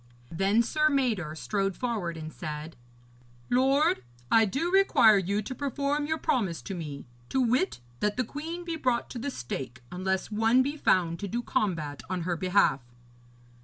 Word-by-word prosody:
Then 195 +7 +3
Sir 305 +5 +2
Mador 225 - 0
strode 195 +2 -1
forward 210 -9 -2
and 155 0 -7
said: 155 0 -6 0.8
'Lord, 265 - +3 0.3
I 225 0 +6
do 275 - -1
require 370 - +6
you 200 +3 -1
to 260 - -5
perform 285 +2 -1
your 315 +1 0
promise 235 - -1
to 195 - -5
me, 150 -6 -6 0.2
to 265 - 0
wit, 255 - +1 0.2
that 210 +2 0
the 255 - +2
queen 325 +8 -6
be 335 -2 -3
brought 250 -5 0
to 245 - -5
the 285 - -2
stake, 130 - -6
unless 190 +3 -2
one 225 +4 +4
be 285 +3 -2
found 170 - +2
to 200 - -4
do 235 +5 -2
combat 155 -12 -1
on 185 -1 -2
her 175 +1 -1
behalf.' 180 -5 +2
215 Hz, 165 wpm, -28 LUFS, 175-270 Hz, 0.8 s, I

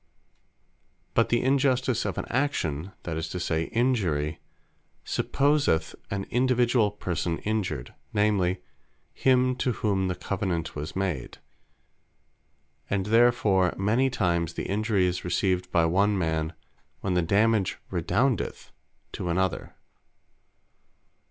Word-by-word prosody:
But - - +3
the 120 - +2
Injustice 130 -2 +2
of - - -3
an - - -2
Action, 95 - -1
(that 80 -2 -3
is 80 0 -3
to 90 - -4
say 80 -2 0
Injury,) 90 - 0 0.7
supposeth 140 - +1 0.2
an 100 -1 -2
individuall 120 -3 +3
person 85 -1 -2
Injured; 105 - -3 0.2
namely 100 -4 +1 0.5
him, 130 -1 +3
to 125 -1 0
whom 100 -4 0
the 90 - -1
Covenant 90 -5 -3
was 75 +1 -5
made: 95 -9 -3 1.5
And 100 -2 0
therefore 110 -5 +3
many 115 +7 +2
times 85 -7 0
the - - -3
injury 105 -1 +1
is 90 0 -1
received 90 0 0
by 85 -1 +3
one 100 +5 +2
man, 80 -2 -1 0.5
when 95 - -1
the 90 - +3
dammage 100 +3 +2
redoundeth 110 +7 0 0.4
to 90 - -4
another. 95 +1 -1
95 Hz, 115 wpm, -27 LUFS, 85-120 Hz, 1.5 s, But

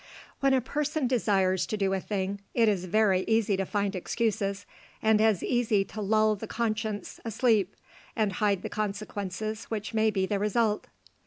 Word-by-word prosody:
When 275 -1 +3
a 260 - +2
person 300 +3 -1
desires 195 -7 +2
to 215 - -2
do 195 -1 +1
a 190 - 0
thing, 200 0 -3
it 230 -2 +4
is 195 -4 +1
very 190 -1 +3
easy 220 -2 +2
to 195 -1 -2
find 200 -1 -1
excuses, 200 0 -1 0.3
and 220 -1 +3
as 220 -5 +3
easy 225 -5 +2
to 215 - -7
lull 215 +1 +3
the 200 - -7
conscience 220 -2 -3
asleep, 220 -4 +1 0.4
and 210 -3 +1
hide 200 -1 +1
the - - -2
consequences 210 0 -4
which 215 0 -4
may 220 0 +3
be 195 -3 0
the 200 +1 -1
result. 210 +1 +1
210 Hz, 170 wpm, -28 LUFS, 195-220 Hz, 0.4 s, it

